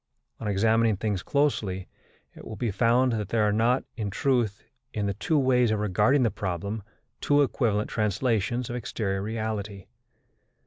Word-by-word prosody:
On 110 - -4
examining 110 +1 +2
things 100 -2 -1
closely, 105 -11 0 0.5
it - - -13
will 110 - -7
be 120 -2 -2
found 120 +5 +3
that 105 -3 -3
there 110 -1 +2
are 105 -1 +2
not, 115 +4 +2
in 105 -4 -3
truth, 115 -1 0 0.3
in 105 -2 -1
the 100 - 0
two 155 - 0
ways 125 -3 +3
of 110 - +1
regarding 115 +7 +3
the 115 - +2
problem, 100 +2 -3 0.4
two 145 0 +3
equivalent 110 -5 0
translations 110 +2 0
of 120 - -4
exterior 100 -5 -2
reality. 110 -2 -4
110 Hz, 155 wpm, -27 LUFS, 100-120 Hz, 0.5 s, found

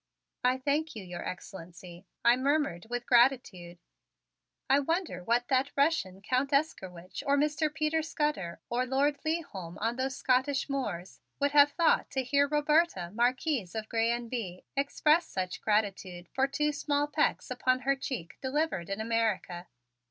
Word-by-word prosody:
"I 250 +1 +3
thank 290 +3 -1
you, 215 - -6
your 175 -1 -7
Excellency," 180 -1 -9 0.2
I 235 +1 +7
murmured 265 - 0
with 245 0 -3
gratitude. 235 -9 +2 0.9
I 275 +2 +5
wonder 325 - -2
what 240 +4 +1
that 265 +1 +2
Russian 275 - +1
Count 255 +5 0
Estzkerwitch 190 - -2
or 280 0 +4
Mr. 300 +1 +1
Peter 310 +1 0
Scudder 295 - -2
or 250 +2 -1
Lord 280 +2 +1
Leigholm 215 - -4
on 230 +3 -1
those 260 0 -1
Scotch 260 +2 +1
moors, 205 -11 -4 0.2
would 285 0 +2
have 290 0 +6
thought 335 -2 +2
to 265 -1 0
hear 280 +3 +2
Roberta, 295 - +1
Marquise 245 - 0
of 220 -1 -4
Grez 230 0 +1
and 235 -1 -9
Bye, 190 -8 -4
express 300 +4 +2
such 185 -1 -4
gratitude 195 -4 -1
for 270 +1 +2
two 300 +2 0
small 290 0 0
pecks 295 - 0
upon 255 0 +1
her 275 +2 +2
cheek 255 -10 -6
delivered 265 - -1
in 195 +1 -3
America. 220 -6 -1
255 Hz, 150 wpm, -30 LUFS, 195-285 Hz, 0.9 s, I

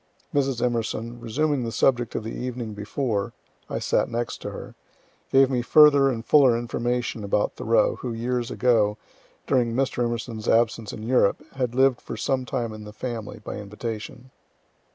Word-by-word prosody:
Mrs. 135 -4 +1
Emerson, 115 0 -2
resuming 135 +4 0
the 115 - -3
subject 120 -1 +1
of - - -2
the 110 - -5
evening 120 -3 -4
before, 105 0 -2 0.4
(I - - -2
sat - - +1
next 120 0 -3
to - - -4
her,) - - -8 0.6
gave 135 0 +5
me 125 -2 +1
further 145 +1 +6
and 115 -3 -3
fuller 135 -6 +5
information 120 -1 -2
about 100 +1 0
Thoreau, 115 +1 +2
who, 125 - -5
years 120 +1 -2
ago, 110 -4 +2 0.5
during 120 -3 +1
Mr. 130 -2 0 0.3
E.'s 110 +1 -4
absence 115 -1 +2
in 110 - -8
Europe, 115 -4 +2
had 125 -3 -2
lived 130 -1 +3
for - - -7
some 130 -1 -1
time 120 -3 -3
in 110 0 -9
the 105 0 -10
family, 115 -1 -6
by - - -5
invitation. 110 +4 -7
120 Hz, 165 wpm, -25 LUFS, 110-130 Hz, 0.6 s, further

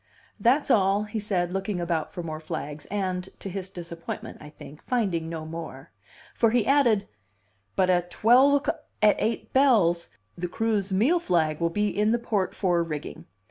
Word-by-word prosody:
"That's 265 +4 +3
all," 200 -1 +3
he 215 +1 -4
said, 185 -4 -1
looking 195 0 -2
about 170 -2 -2
for 180 -4 -6
more 155 -1 -5
flags, 155 -2 -6
and 190 -2 -2
(to 195 - -7
his 190 0 -5
disappointment, 170 -3 -7
I 150 - -10
think) 150 0 -13
finding 190 -10 -1
no 160 -1 -5
more. 160 -4 -8 0.4
For 230 - +3
he 230 -1 +2
added: 240 -7 +3 0.7
"But 185 -1 +3
at 175 -1 +1
twelve 265 +8 +4
o'c 300 - -1 0.3
at 210 - +6
eight 230 - -2
bells, 210 -11 +3 0.3
the 180 +1 -3
crew's 210 0 -1
meal 245 - +3
flag 160 - 0
will 170 - +2
be 210 +4 0
in 210 +2 +2
the - - +3
port 210 -5 -1
fore 175 -3 +1
rigging. 150 - -5
190 Hz, 175 wpm, -26 LUFS, 170-220 Hz, 0.7 s, at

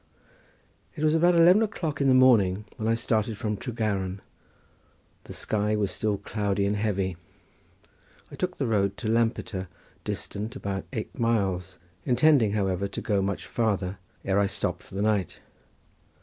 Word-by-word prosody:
It 150 - -4
was 155 0 +4
about 175 +2 +4
eleven 175 +5 +6
o'clock 175 -10 -2
in 140 - +3
the 130 - +5
morning 105 -6 +4
when 110 - -2
I 115 - +3
started 110 -2 0
from 105 0 -2
Tregaron; 100 -4 -2 1.1
the - - -10
sky 105 0 0
was 105 -2 0
still 105 -2 -1
cloudy 100 0 -1
and 100 +1 +1
heavy. 100 -4 -1 1.1
I - - -8
took 180 0 -3
the 135 - -1
road 100 -4 +1
to 115 - -4
Lampeter, 110 -4 0 0.4
distant 105 +3 -4
about 95 -1 -4
eight 110 -5 -5
miles, 95 -6 0 0.3
intending, 125 -4 +4
however, 100 -2 0
to 100 - -6
go 100 -3 0
much 100 0 -2
farther 100 -5 -1 0.3
ere 100 +1 +2
I 100 - +3
stopped 100 - -2
for - - -14
the 100 - 0
night. 105 -5 0
105 Hz, 155 wpm, -27 LUFS, 100-115 Hz, 1.1 s, eleven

